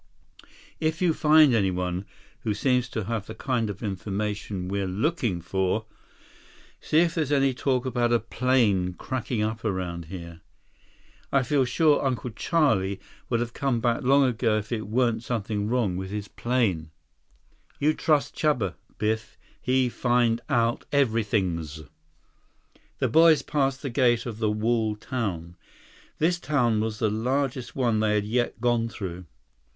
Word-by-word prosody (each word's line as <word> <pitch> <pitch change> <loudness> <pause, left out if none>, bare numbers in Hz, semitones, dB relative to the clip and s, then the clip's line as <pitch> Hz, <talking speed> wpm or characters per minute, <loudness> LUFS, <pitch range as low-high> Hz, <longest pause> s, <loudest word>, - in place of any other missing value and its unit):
"If 160 +1 0
you 175 -3 +3
find 155 -3 +5
anyone 90 -3 0 0.3
who 105 -2 -2
seems 125 +2 +1
to 110 -3 -3
have 110 0 -3
the 110 - -7
kind 120 -5 -1
of 100 +2 -7
information 100 -1 -3
we're 100 0 -1
looking 110 - -1
for, 95 +5 -1 0.9
see 155 - +3
if 170 -1 +1
there's 155 -4 -1
any 135 -2 +3
talk 130 0 0
about 120 -2 0
a 120 - +5
plane 115 -6 +1
cracking 120 -2 -3
up 110 +1 -3
around 90 -5 -3
here. 85 -1 -9 0.9
I 140 -2 +3
feel 135 +1 +2
sure 150 +4 +3
Uncle 130 -2 -1
Charlie 110 - +1 0.3
would 120 - +1
have 120 -1 -3
come 135 -4 0
back 120 +3 +1
long 140 +2 +4
ago 115 -3 +1
if 110 0 -4
there 115 -3 -2
weren't 115 +1 +1
something 105 -3 -2
wrong 110 -6 0
with 95 0 -5
his 105 0 -4
plane." 105 -12 -1 0.9
"You 150 +2 +2
trust 150 -2 +1
Chuba, 125 - +1 0.2
Biff. 110 +1 -2 0.2
He 130 0 +2
find 120 -1 +1
out 115 0 +1
everythings." 100 - 0 1.2
The - - +1
boys 160 -1 +5
passed 135 -2 0
the 135 - -3
gate 120 -2 +2
of 115 -3 -6
the 110 -2 +1
walled 110 0 0
town. 90 -10 -4 0.6
This 175 +3 +1
town 125 -8 +1
was 110 0 -2
the 110 -2 +1
largest 125 +3 -1
one 120 -5 +1
they 105 -1 +2
had 105 -1 0
yet 120 +1 -1
gone 120 -1 +1
through. 90 -4 -6
115 Hz, 150 wpm, -26 LUFS, 105-130 Hz, 1.2 s, find